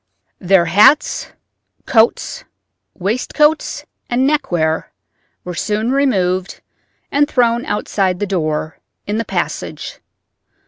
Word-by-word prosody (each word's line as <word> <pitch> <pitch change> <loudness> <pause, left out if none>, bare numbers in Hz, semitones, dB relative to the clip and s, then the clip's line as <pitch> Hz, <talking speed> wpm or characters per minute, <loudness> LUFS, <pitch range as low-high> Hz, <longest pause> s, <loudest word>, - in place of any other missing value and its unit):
Their 185 -2 +3
hats, 215 - +4 0.5
coats, 235 - +2 0.5
waistcoats, 255 - 0 0.2
and 245 +2 +1
neckwear 175 - 0 0.5
were 180 - -6
soon 215 +6 -1
removed 190 -9 0 0.5
and 290 +1 +3
thrown 235 -3 +1
outside 195 -3 -1
the 205 - 0
door, 155 -5 -2 0.3
in 205 +1 -2
the 230 - -2
passage. - - -4
210 Hz, 95 wpm, -17 LUFS, 180-255 Hz, 0.5 s, hats